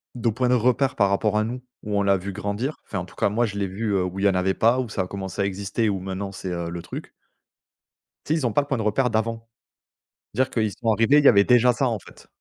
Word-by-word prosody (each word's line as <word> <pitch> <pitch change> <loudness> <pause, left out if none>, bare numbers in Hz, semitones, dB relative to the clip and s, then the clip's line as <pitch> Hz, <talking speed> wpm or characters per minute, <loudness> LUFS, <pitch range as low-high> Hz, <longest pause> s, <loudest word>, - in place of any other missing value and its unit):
De 120 -2 0
points 125 +3 0
de 125 - +4
repère 125 +3 +1
par 100 - +4
rapport 105 +2 +1
à 105 - +2
nous, 125 +3 -5 0.2
où 105 -1 -2
on 100 - +2
l'a 100 0 +3
vu 95 +2 -6
grandir. 105 +8 -3
Enfin 95 - -4
en 90 - -5
tout - - -17
cas - - +1
moi 115 +4 +1
je 100 -2 -5
l'ai 100 -1 -1
vu, 105 +3 -3
heu, 95 - +2
où 90 +1 -4
il 100 - 0
y - - +6
en - - +1
avait 90 +1 +1
pas, 115 +5 +3
où 125 - -5
ça 95 - -1
a - - -7
commencé 95 0 -5
à - - +2
exister, 100 +3 -1
où 100 -2 0
maintenant 95 +1 -5
c'est, 95 -1 -6
heu, 85 -1 -3
le 85 0 -5
truc - - -8 1.2
tu 155 - 0
sais 160 - +1
ils 135 - -2
ont 115 - -3
pas 145 - +4
le 140 - -8
point 135 -3 -1
de 110 - -2
repère 115 +5 +1
d'avant. 115 +1 -2 0.9
C'est-à-dire 130 0 +1
qu'ils 110 -3 0
sont 115 +1 -1
arrivés, 115 +7 +4
il 145 - 0
y - - +9
avait 100 -4 +6
déjà 125 0 +5
ça 135 +2 0
en 115 -3 -1
fait. - - -17
105 Hz, 295 wpm, -24 LUFS, 100-120 Hz, 1.2 s, y